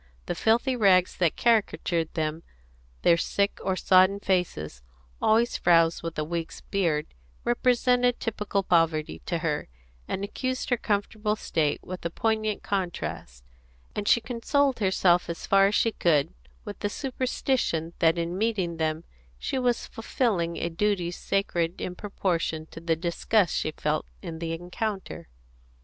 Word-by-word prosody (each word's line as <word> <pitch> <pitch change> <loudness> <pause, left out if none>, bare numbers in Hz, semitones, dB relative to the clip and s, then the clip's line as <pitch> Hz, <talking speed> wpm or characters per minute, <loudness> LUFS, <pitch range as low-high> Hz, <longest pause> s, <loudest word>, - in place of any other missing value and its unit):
The - - -2
filthy 240 +4 +2
rags 190 -6 +4
that 170 -3 +1
caricatured 175 -7 +1
them, 155 0 -1 0.6
their 170 - +5
sick 200 +4 0
or 190 -1 0
sodden 185 +2 +4
faces, 170 - -1 0.4
always 230 +2 +3
frowsed 165 -1 +4
with 165 0 -5
a 155 - 0
week's 165 +1 -4
beard, 165 -7 0 0.4
represented 245 0 +2
typical 210 -3 -2
poverty 160 - +1
to - - 0
her, - - -1 0.4
and 195 - -3
accused 255 +6 -3
her 245 - +4
comfortable 210 0 -1
state 155 -8 -1
with 185 0 -7
a 170 - -1
poignant 215 +2 -1
contrast; 175 - -4 0.5
and 205 - -3
she - - +5
consoled 250 +4 0
herself 185 -3 +3
as 170 - -5
far 195 0 +5
as 205 - 0
she 230 - +3
could 150 - +2 0.3
with - - -7
the 205 - -1
superstition 255 - -1
that 165 +1 +4
in 170 +1 -2
meeting 195 -7 0
them 160 0 -1 0.3
she 260 - -2
was 245 -2 +1
fulfilling 210 -7 -1
a - - -1
duty 180 0 0
sacred 175 -2 -1
in 180 - -4
proportion 175 -5 -2
to - - -8
the 165 -1 +1
disgust 175 +3 +1
she - - 0
felt 155 0 -2 0.2
in 165 -3 -6
the 165 -1 -3
encounter. 190 +4 -4
185 Hz, 145 wpm, -27 LUFS, 165-220 Hz, 0.6 s, their